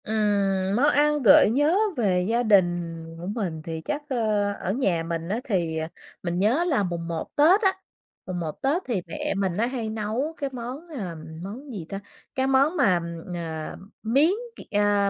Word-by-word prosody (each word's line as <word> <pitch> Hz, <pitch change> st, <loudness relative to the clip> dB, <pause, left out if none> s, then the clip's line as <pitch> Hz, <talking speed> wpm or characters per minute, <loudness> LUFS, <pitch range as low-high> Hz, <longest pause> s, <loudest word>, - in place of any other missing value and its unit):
Ừm, 200 Hz, -3 st, +1 dB
món 255 Hz, +6 st, +4 dB
ăn 295 Hz, 0 st, +3 dB
gợi 205 Hz, -1 st, +8 dB
nhớ 290 Hz, -, +3 dB, 0.2 s
về 185 Hz, -6 st, +2 dB
gia 235 Hz, +2 st, +2 dB
đình 175 Hz, -6 st, +2 dB, 0.2 s
của 175 Hz, -, -6 dB
mình 190 Hz, -7 st, -3 dB
thì 160 Hz, 0 st, -5 dB
chắc, 295 Hz, -, -3 dB
ờ, 215 Hz, -5 st, +1 dB
ở 190 Hz, -, -3 dB
nhà 190 Hz, -10 st, +1 dB
mình 165 Hz, 0 st, -4 dB
á 215 Hz, +4 st, 0 dB
thì, 175 Hz, -9 st, -1 dB
ờ, 160 Hz, 0 st, -2 dB, 0.4 s
mình 175 Hz, 0 st, -1 dB
nhớ 235 Hz, -, +3 dB
là 270 Hz, -, +2 dB
mùng 170 Hz, -2 st, -3 dB
một 165 Hz, -1 st, -5 dB
Tết 340 Hz, +8 st, +6 dB
á, 385 Hz, -2 st, +2 dB, 0.5 s
mùng 180 Hz, -1 st, -4 dB
một 160 Hz, -3 st, -5 dB
Tết 290 Hz, +7 st, +1 dB
thì 225 Hz, -7 st, -1 dB
mẹ 300 Hz, 0 st, -2 dB
mình 190 Hz, -3 st, 0 dB
á 225 Hz, -, +2 dB
hay 240 Hz, -4 st, -3 dB
nấu 220 Hz, +8 st, -2 dB
cái 280 Hz, -2 st, -2 dB
món, 255 Hz, +7 st, -6 dB
à, 200 Hz, -, -5 dB, 0.3 s
món 250 Hz, +9 st, -7 dB
gì 195 Hz, -8 st, -6 dB
ta? 195 Hz, -, -4 dB, 0.4 s
Cái 265 Hz, 0 st, +1 dB
món 275 Hz, +6 st, +3 dB
mà, 195 Hz, -, +4 dB, 0.4 s
ờ, 160 Hz, -2 st, -5 dB, 0.3 s
miến 270 Hz, +8 st, +4 dB, 0.3 s
c -, -, -15 dB
ờ, 205 Hz, -1 st, +3 dB
210 Hz, 190 wpm, -25 LUFS, 180-270 Hz, 0.5 s, gợi